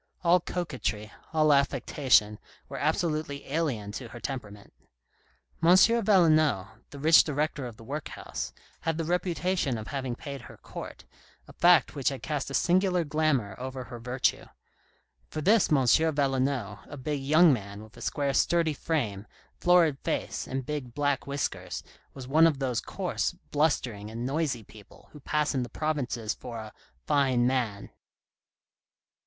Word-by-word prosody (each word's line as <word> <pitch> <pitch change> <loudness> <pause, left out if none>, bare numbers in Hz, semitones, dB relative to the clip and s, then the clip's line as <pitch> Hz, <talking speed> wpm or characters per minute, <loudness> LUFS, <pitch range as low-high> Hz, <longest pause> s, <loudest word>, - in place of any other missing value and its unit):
All 175 +1 +5
coquetry, 125 - -3 0.2
all 155 -2 +4
affectation, 130 -6 +2 0.3
were 135 - -6
absolutely 155 -2 -1
alien 135 -9 -2
to 120 +3 -6
her 115 +2 -10
temperament. 105 -7 -7 0.9
M. 165 - +4
Valenod, 170 - +4 0.2
the 140 - -10
rich 160 +4 +6
director 150 -2 -2
of 115 -3 -10
the - - -13
workhouse, 145 +6 -5 0.3
had 165 0 -2
the 165 - -1
reputation 180 -5 0
of 110 -1 -7
having 130 -3 -3
paid 140 0 -7
her - - -13
court, - - -9 0.4
a - - -13
fact 175 0 +4
which 140 -3 0
had 135 -2 -7
cast 150 -4 -2
a 135 - -3
singular 180 +3 +2
glamour 145 -9 0
over 130 0 -5
her 120 -1 -9
virtue; 125 +2 0 0.8
for - - -5
this 205 +5 +3
M. 135 -4 +4
Valenod, 135 -6 +1
a 145 - -8
big 140 +1 -3
young 155 +3 +5
man 100 -2 -5
with 110 - -16
a - - -13
square, 140 -1 -1
sturdy 165 +2 +2
frame, 115 -11 -2 0.3
florid 170 -6 +4
face, - - -3
and 130 -1 -3
big, 140 -5 -5
black 145 -2 0
whiskers, 140 0 -3 0.3
was 130 -2 -8
one 160 +4 +6
of 155 -4 0
those 130 -4 -1
coarse, - - -2 0.2
blustering, 125 -9 0
and 115 +2 -5
noisy 135 -4 -1
people 105 0 -17
who 150 - -12
pass 150 +2 0
in 130 - 0
the 120 - -4
provinces 130 -8 -2
for 120 -2 -8
a 110 -1 -8 0.2
" 60 0 -40
fine 130 -4 +2
man." 120 -6 -1
140 Hz, 155 wpm, -28 LUFS, 120-155 Hz, 0.9 s, rich